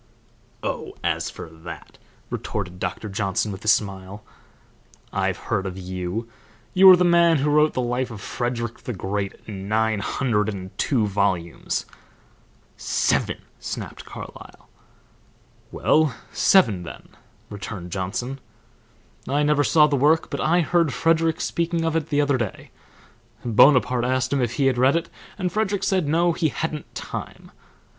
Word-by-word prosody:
"Oh, - - -3
as - - 0
for - - -9
that," 80 +1 -11 0.3
retorted 90 -4 -4
Doctor 90 +4 -3
Johnson, 100 0 -1
with 95 - -8
a - - -7
smile, 100 -1 0 0.9
"I've - - 0
heard 95 -2 -2
of 95 0 -6
you; 95 +4 -4 0.5
you 190 +1 +8
are 185 - +11
the 180 - +3
man 170 -2 +5
who 145 +2 +1
wrote 150 +1 +4
the 125 - -1
life 125 +1 -1
of 110 -3 -8
Frederick 120 +1 -3
the 125 - -5
Great 100 +1 -3
in 100 -2 -7
nine 110 0 +1
hundred 105 -1 0
and 95 -2 -7
two 120 -7 +2
volumes 95 -4 -1 0.5
" - - -34 0.2
"Seven!" - - +1 0.2
snapped - - -6
Carlyle. - - -11 1.0
"Well, 155 -5 +2 0.2
seven 115 - +4
then," 85 -1 -10 0.4
returned 100 -3 -7
Johnson. 115 +8 -3 0.9
"I 145 +3 +1
never 150 0 +3
saw 150 +1 +5
the 145 -1 +1
work, 150 +4 +3
but - - -2
I 170 +3 +3
heard 165 -5 +1
Frederick 165 +3 +2
speaking 170 -1 -1
of 165 0 0
it 160 -1 -1
the 145 -1 +2
other 140 -3 +1
day. 110 -5 -5 0.7
Bonaparte 125 +1 +5
asked 130 +1 0
him 140 - +1
if 120 -1 0
he 140 +1 +1
had 130 -2 +2
read 130 +4 +4
it, 170 - -2 0.3
and 185 -3 -1
Frederick 205 -1 0
said 190 -5 +1
no, 170 +3 +3
he 160 -1 0
hadn't 155 0 -5
time. - - -7
125 Hz, 150 wpm, -23 LUFS, 100-155 Hz, 1.0 s, are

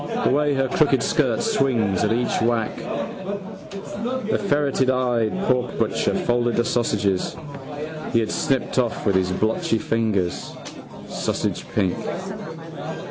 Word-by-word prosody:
The - - +4
way 145 +1 +3
her 135 0 +2
crooked 135 -2 +3
skirt 130 -8 +2
swings 115 -9 +2
at 105 - +2
each 120 +2 +1
whack. 115 -1 +1
The 200 +4 -4
ferreteyed 130 - +2
porkbutcher 125 -1 +1
folded 120 -1 +2
the 120 - +2
sausages 105 -6 +1 0.8
he 115 - +4
had 110 -2 -1
snipped 135 -1 +1
off 120 -3 0
with 95 -2 +2
blotchy 110 +1 +1
fingers, 110 -6 0 0.5
sausagepink. 95 -4 -1
120 Hz, 105 wpm, -23 LUFS, 110-140 Hz, 0.8 s, The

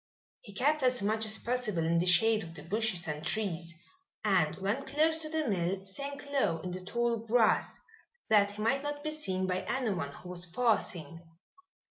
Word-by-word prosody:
He 200 -3 -13
kept 295 +7 +2
as 250 -4 +1
much 220 +2 +1
as 215 0 +4
possible 230 -9 -1
in 165 +1 +2
the 180 - 0
shade 220 +4 +4
of 165 -1 -10
the 150 - -10
bushes 190 -1 0
and 150 0 -4
trees 170 -4 -1 0.5
and 180 -7 +3
when 205 +8 -2
close 315 +4 +2
to 310 - -3
the 315 -2 -1
mill 190 -1 -1
sank 280 +9 -6
low 210 -13 +1
in 180 - -5
the 180 +1 -6
tall 235 +4 0
grass, 225 0 +2 0.5
that 205 -2 +4
he 210 +1 -5
might 270 +5 +2
not 290 0 -4
be 310 - -2
seen 190 -12 -1
by 185 0 -1
anyone 200 - -2
who 180 - -11
was 180 0 -2
passing. 170 -6 -1
210 Hz, 185 wpm, -31 LUFS, 180-250 Hz, 0.5 s, as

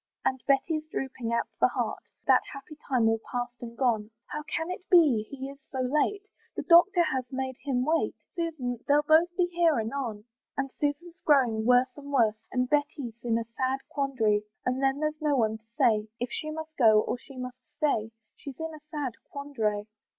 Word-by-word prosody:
And 260 -1 +1
Betty's 305 +3 +2
drooping 260 -5 -3
at 235 - +1
the - - +6
heart, - - -3 0.2
That - - +6
happy 275 +2 -10
time 245 -4 +3
all 225 0 +2
past 245 0 -2
and 235 -1 -8
gone, 225 -5 +1 0.2
"How 300 - -5
can 320 +3 -3
it 365 0 -7
be 285 - +5
he 270 -1 -6
is 275 0 -10
so 265 - -4
late? 300 +10 +1 0.3
"The - - -3
doctor 350 +1 +6
he - - -1
has 255 0 -3
made 260 -1 -3
him 255 -3 0
wait, 320 +2 +1 0.2
"Susan! 305 -9 -3
they'll 290 +1 +4
both 315 +3 +5
be 360 - +4
here 335 -5 +3
anon." 225 -2 -3 0.3
And 270 -1 -1
Susan's 330 +6 -3
growing 240 -7 +3
worse 250 +1 +4
and 285 -1 -9
worse, 225 -5 +2
And 250 0 +1
Betty's 275 -5 -1
in 230 -1 +1
a 230 - -1
sad 260 +3 -2
quandary; 235 -7 +1 0.2
And 255 +1 0
then 270 +2 +1
there's 305 0 -1
nobody 245 -8 +2
to 220 0 -35
say 220 -5 +3
If 245 0 -3
she 310 - -4
must 315 0 -6
go 220 -4 +6
or 245 - -3
she 270 +2 -13
must 250 0 -6 0.2
stay: 225 -8 +1 0.3
She's 275 -1 -9
in 320 0 -4
a 310 - -9
sad 290 -6 -3 0.2
quandary. 225 -8 -2
265 Hz, 195 wpm, -28 LUFS, 235-300 Hz, 0.3 s, the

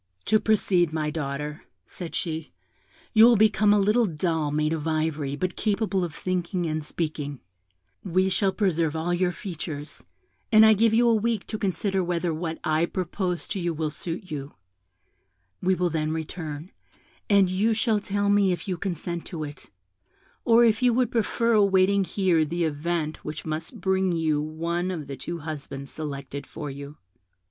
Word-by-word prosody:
'To 215 0 +4
proceed, 185 -6 +2
my 155 -1 -1
daughter,' 150 0 -4 0.2
said 175 -3 -7
she, 160 -2 -3 0.6
'you 220 - +7
will 240 +1 +8
become 215 0 +4
a 210 - +5
little 210 +3 +3
doll 160 -2 -1
made 155 +2 0
of 160 -1 -3
ivory, 155 -3 -1
but 180 +4 -2
capable 205 -3 0
of 170 - -3
thinking 180 -1 -2
and 155 -1 -2
speaking; 150 -3 -4 0.6
we 185 0 +2
shall 190 +1 +2
preserve 170 -6 0
all 165 +2 -1
your 180 0 +1
features, 155 -5 -7 0.5
and 215 0 +8
I 220 - +8
give 225 +2 +3
you 235 +2 +4
a 230 - +5
week 225 -1 0
to 215 - -4
consider 195 0 0
whether 175 -1 -1
what 160 0 -3
I 155 +2 +2
propose 180 0 -2
to 200 - -2
you 170 -2 -1
will 155 -1 -2
suit 170 +3 -6
you; 140 -2 -5 1.1
we 185 +1 +2
will 180 -1 0
then 155 -1 -1
return, 160 0 -5 0.6
and 200 -2 +5
you 205 +5 +1
shall 220 -1 +2
tell 205 0 -1
me 200 -2 +4
if 175 - -4
you 185 -2 -2
consent 170 -2 -4
to 165 -4 -5
it, 145 0 -9 0.7
or 235 0 +6
if 220 +1 +2
you 245 -2 +4
would 250 -1 +2
prefer 230 0 +1
awaiting 200 -1 +4
here 180 -5 +2
the 170 +3 -1
event 155 0 -2
which 150 0 -6
must 160 +8 -4
bring 190 -1 +1
you 160 -3 +1
one 170 +4 -2
of 165 -5 -4
the 140 0 -6
two 170 +6 -5
husbands 140 -3 -6
selected 140 -2 -6
for 150 -2 -6
you.' 140 +2 -9
175 Hz, 170 wpm, -26 LUFS, 155-200 Hz, 1.1 s, will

